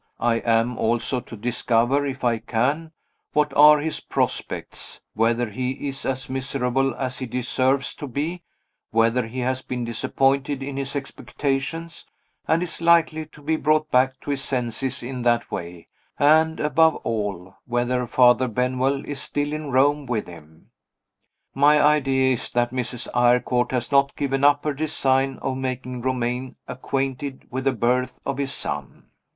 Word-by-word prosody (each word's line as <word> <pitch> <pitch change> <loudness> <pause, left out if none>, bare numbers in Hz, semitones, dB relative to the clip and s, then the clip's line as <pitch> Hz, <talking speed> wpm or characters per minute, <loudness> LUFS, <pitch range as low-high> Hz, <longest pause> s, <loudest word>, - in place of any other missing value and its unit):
I 115 -1 +2
am 115 +1 +1
also 120 +3 0
to 120 -1 -10
discover, 120 +4 +1
if 135 -1 -5
I 115 -2 +2
can, 140 +10 -1 0.4
what 150 -1 +2
are 150 +1 +8
his 155 +2 -3
prospects - - -3
whether 115 +1 +1
he 130 +5 -3
is 135 0 -5
as 130 -1 -2
miserable 135 -1 -1
as 130 0 -4
he 130 - -4
deserves 130 +3 0
to 145 - -6
be 155 +7 -3 0.5
whether 115 +2 +2
he 125 +3 -5
has 130 +1 -1
been 125 -2 -4
disappointed 135 +4 0
in 140 0 -5
his 140 +1 -4
expectations, 140 +3 -4 0.4
and 165 +2 +2
is 175 - -7
likely 165 -2 +3
to 150 -1 -17
be 160 +2 +1
brought 155 0 +1
back 130 +1 +3
to 145 - -4
his 140 -1 -2
senses 130 +1 -2
in 125 +1 -5
that 120 -1 +1
way 85 -1 -6 0.3
and, 160 +2 +4
above 160 +1 +3
all, 100 -4 -3
whether 125 +1 0
Father 125 +1 +4
Benwell 130 +3 0
is 145 -2 -5
still 145 +1 -2
at 155 - -3
Rome 140 +2 +3
with 115 -4 -1
him. 80 -2 -15 0.8
My 145 +2 +5
idea 135 -3 +3
is 120 - -4
that 120 0 +1
Mrs. 125 -1 -4
Eyrecourt 125 0 +2
has 125 +1 -2
not 140 0 +3
given 135 -1 -1
up 145 0 +5
her 150 - 0
design 135 -3 0
of 130 -1 -1
making 130 -1 -4
Romayne 125 0 -2
acquainted 135 +1 -3
with 130 +2 -3
the 135 - +4
birth 125 +1 0
of 140 0 -2
his 140 -1 -1
son. - - -6
130 Hz, 155 wpm, -23 LUFS, 120-140 Hz, 0.8 s, are